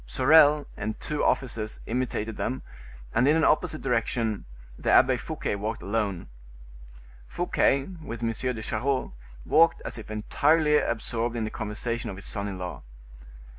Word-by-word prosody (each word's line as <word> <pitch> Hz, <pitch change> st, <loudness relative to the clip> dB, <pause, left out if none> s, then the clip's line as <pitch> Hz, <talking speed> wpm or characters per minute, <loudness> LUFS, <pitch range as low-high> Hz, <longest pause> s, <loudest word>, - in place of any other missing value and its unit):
Sorel 145 Hz, -, +5 dB
and 110 Hz, +1 st, -4 dB
two 150 Hz, -1 st, -2 dB
officers 115 Hz, -4 st, -1 dB
imitated 115 Hz, -3 st, -2 dB
them, 130 Hz, -, -3 dB, 0.5 s
and 125 Hz, +4 st, +3 dB
in 150 Hz, -, +5 dB
an 160 Hz, -, +2 dB
opposite 155 Hz, 0 st, +2 dB
direction. 115 Hz, -4 st, -1 dB, 0.3 s
The -, -, -3 dB
Abbe -, -, +6 dB
Fouquet -, -, -3 dB
walked 110 Hz, +2 st, -4 dB
alone. 100 Hz, -4 st, -2 dB, 1.0 s
Fouquet, 135 Hz, -, +1 dB, 0.2 s
with 120 Hz, -5 st, -6 dB
M. 115 Hz, -, +1 dB
de 115 Hz, -1 st, -3 dB
Charost, 130 Hz, -, -1 dB, 0.3 s
walked 165 Hz, +2 st, +4 dB
as -, -, -5 dB
if 110 Hz, -, -10 dB
entirely 150 Hz, +8 st, +2 dB
absorbed 115 Hz, +1 st, -2 dB
in 115 Hz, -, -1 dB
the 110 Hz, -, -3 dB
conversation 115 Hz, +2 st, -3 dB
of 95 Hz, -, -6 dB
his 95 Hz, -, -8 dB
son 100 Hz, 0 st, -2 dB
in 95 Hz, -2 st, -5 dB
law. 90 Hz, -1 st, -6 dB
115 Hz, 150 wpm, -27 LUFS, 110-135 Hz, 1.0 s, Abbe